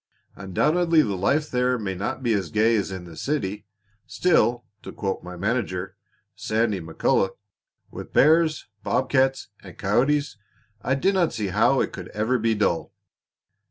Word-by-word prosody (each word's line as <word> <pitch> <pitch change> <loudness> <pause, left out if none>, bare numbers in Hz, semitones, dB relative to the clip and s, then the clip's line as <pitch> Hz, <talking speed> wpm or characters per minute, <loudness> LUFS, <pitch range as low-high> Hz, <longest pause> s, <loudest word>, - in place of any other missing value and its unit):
Undoubtedly 155 - +2
the 100 - -2
life 145 +11 0
there 125 0 +1
may 100 -4 -3
not 105 +8 -4
be 120 -2 +2
as 95 -5 -1
gay 110 +2 +3
as 100 -3 -1
in 95 -2 -6
the 85 -2 -11
city; 105 - -3 0.4
still 125 -9 +2 0.2
to - - -9
quote 95 -2 -3
my 90 0 -8
manager, 95 -2 -2 0.4
Sandy 110 -2 -1
McCulloch, 85 +4 0 0.5
'with - - -9
bears, 155 0 +3 0.2
bob - - -1
cats, 135 0 +1
and - - -13
coyotes, 135 +7 +1 0.4
I 130 +5 0
dinna 185 +3 +2
see 105 -4 -3
how - - +3
it - - -2
could - - -7
ever 110 +4 +1
be 115 0 +1
dull.'" 100 -5 0
115 Hz, 155 wpm, -24 LUFS, 95-135 Hz, 0.5 s, gay